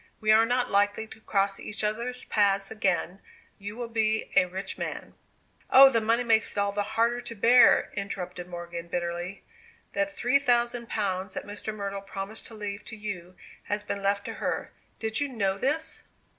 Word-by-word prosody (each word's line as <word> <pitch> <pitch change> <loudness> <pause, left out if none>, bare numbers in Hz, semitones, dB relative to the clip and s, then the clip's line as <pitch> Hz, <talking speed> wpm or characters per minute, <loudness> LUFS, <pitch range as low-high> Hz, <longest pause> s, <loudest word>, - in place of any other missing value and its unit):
We 215 0 +3
are 225 +1 +6
not 245 +1 0
likely 205 +2 +2
to 220 0 -14
cross 195 -2 0
each 210 +1 -3
other's 235 +4 -2
paths 200 -1 +2
again; 190 -3 0 0.4
you 205 +1 -7
will 240 -1 -4
be 220 -1 0
a 185 - +6
rich 190 +1 -3
man - - -5 0.3
" - - -35
"Oh, 270 0 +9
the 230 -3 +2
money 230 +2 +2
makes 225 -2 +2
it - - -10
all 200 0 +2
the 205 +1 -1 0.2
harder 235 +1 +2
to 240 -1 -8
bear!" 240 +4 +6
interrupted 180 -3 -5
Morgan, 170 -1 -7
bitterly. 175 +2 -4 0.5
"That 295 0 0
three 280 -2 +2
thousand 240 -2 +1
pounds 190 -2 -2
that - - -4
Mr. 205 +1 -5
Myrtle 200 -2 -4
promised 195 +2 -6
to 225 - -10
leave 205 -1 -5
to - - -7
you 185 -4 -6 0.3
has 205 0 -2
been 200 -1 -4
left 200 0 0
to - - -4
her. - - -2 0.3
Did 220 0 -2
you 290 - 0
know 195 -7 -1
this?" 305 +7 -1
210 Hz, 185 wpm, -27 LUFS, 195-230 Hz, 0.5 s, Oh